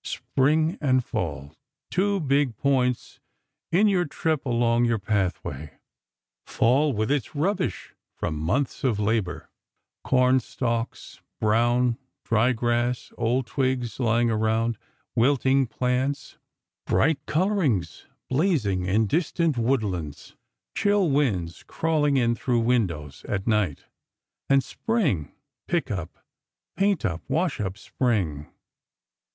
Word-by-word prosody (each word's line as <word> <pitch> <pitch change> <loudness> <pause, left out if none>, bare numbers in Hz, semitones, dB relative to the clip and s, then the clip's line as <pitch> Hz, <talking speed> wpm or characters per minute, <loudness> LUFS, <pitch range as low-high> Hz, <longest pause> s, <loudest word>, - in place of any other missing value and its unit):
Spring 155 +5 0
and 130 -4 +2
Fall; 70 +3 -4 0.4
two 200 +2 +1
big 140 - +1
points 125 -3 0 0.5
in 195 +6 +4
your 185 -3 +2
trip 155 0 -1
along 120 0 +2
your 115 -1 +2
Pathway. 95 -8 -2 0.7
Fall 135 +6 +2
with 110 0 -1
its 145 0 -1
rubbish 185 +6 -1 0.2
from 80 - -3
months 100 - -1
of 125 -6 +1
labor: 100 -6 -1 0.5
cornstalks, 125 -2 0 0.2
brown, 120 +3 +2 0.3
dry 115 +3 +3
grass, 120 +1 -1
old 120 +2 0
twigs 130 -3 -1
lying 120 -1 +2
around, 110 +1 0 0.4
wilting 135 +1 +3
plants; 130 +4 -2 0.5
bright 150 -3 +2
colorings 155 - 0 0.2
blazing 130 - +1
in 105 +4 +2
distant 165 - 0
woodlands; 105 - -2 0.4
chill 205 -5 +2
winds 100 - 0
crawling 150 -3 +1
in 120 -2 +2
through 120 0 0
windows, 90 - -1
at 95 -2 -2
night. 105 -10 0 0.7
And 135 -1 +4
Spring! 140 - -1 0.4
Pick 170 -8 -1
up, 90 -5 -5 0.6
paint 195 - +1
up, 85 -5 -2
wash 160 +4 0
up 95 -1 -3
Spring!! 95 - -1
120 Hz, 110 wpm, -25 LUFS, 110-145 Hz, 0.7 s, in